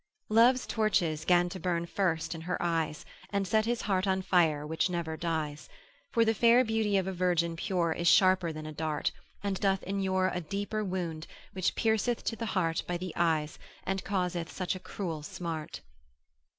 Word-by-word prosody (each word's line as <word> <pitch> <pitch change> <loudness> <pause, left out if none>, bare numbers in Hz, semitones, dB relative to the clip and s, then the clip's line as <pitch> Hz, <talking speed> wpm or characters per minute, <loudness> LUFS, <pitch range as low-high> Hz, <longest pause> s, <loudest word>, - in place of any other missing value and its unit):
Love's 240 +4 +5
torches 175 -8 0
'gan 175 0 +4
to 185 +1 -6
burn 170 -1 -1
first 170 -3 -1
in 165 - -7
her 180 +2 -2
eyes. 165 -3 -1 0.2
And 200 -1 -1
set 215 +2 +2
his 240 0 -1
heart 195 -1 +1
on 190 0 +1
fire 160 -6 +2
which 160 +4 0
never 170 -3 -2
dies: 160 -3 -3 0.4
For 230 -1 +3
the 225 - +3
fair 235 +3 +5
beauty 220 -2 +1
of 190 - +1
a 190 - -3
virgin 175 -2 +1
pure 175 -2 0
Is 170 +1 -2
sharper 185 +2 +5
than 155 0 -7
a 155 - -5
dart, 155 -1 -1 0.3
and 200 -2 -1
doth 195 -1 +1
inure 190 -1 0
A 180 - -2
deeper 205 +5 -3
wound, 175 -5 -3 0.3
which 185 -1 0
pierceth 225 +1 +1
to 225 - -1
the 230 0 -4
heart 165 -3 +1
By 175 - -1
the 180 -1 -6
eyes, 160 -3 0 0.2
and 190 0 -2
causeth 180 -4 -2
such 185 -2 -2
a - - -6
cruel 170 -5 -5
smart. 160 0 -5
180 Hz, 185 wpm, -30 LUFS, 165-195 Hz, 0.4 s, Love's